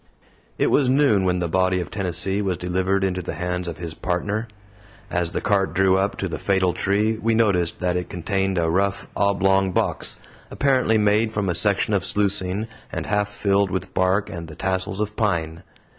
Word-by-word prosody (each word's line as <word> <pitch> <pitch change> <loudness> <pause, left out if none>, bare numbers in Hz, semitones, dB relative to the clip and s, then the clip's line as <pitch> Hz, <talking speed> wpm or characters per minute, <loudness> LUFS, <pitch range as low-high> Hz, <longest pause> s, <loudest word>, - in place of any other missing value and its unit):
It - - +1
was 135 -3 +3
noon 130 -8 +3
when 90 -1 +1
the 90 -1 -1
body 95 +2 +1
of 90 - -5
Tennessee 95 +1 0
was 95 -3 -1
delivered 95 +2 0
into 95 -1 -1
the - - -5
hands 90 0 -3
of 85 - -5
his 85 -1 -6
Partner. 105 +7 -2 0.6
As 85 -1 0
the - - -2
cart 95 -6 +1
drew 95 0 +4
up 95 +1 0
to - - -2
the - - -5
fatal 95 -2 +1
tree, 105 +3 0
we 115 +1 +1
noticed 95 -7 +1
that 90 -1 0
it 90 0 -3
contained 95 +2 -1
a 85 -1 +1
rough, 100 +2 0
oblong 95 -1 +2
box - - 0 0.3
apparently 130 -5 +2
made 105 +1 +2
from 105 -3 -1
a - - +1
section 100 +4 +2
of 100 - +1
sluicing 100 0 +1 0.2
and - - -4
half 105 -1 0
filled 100 -1 +1
with 95 0 -4
bark 95 +2 +1
and 85 -1 -7
the 80 - -10
tassels 95 +3 -2
of 105 0 -2
pine. 85 -6 -1
95 Hz, 190 wpm, -23 LUFS, 90-105 Hz, 0.6 s, drew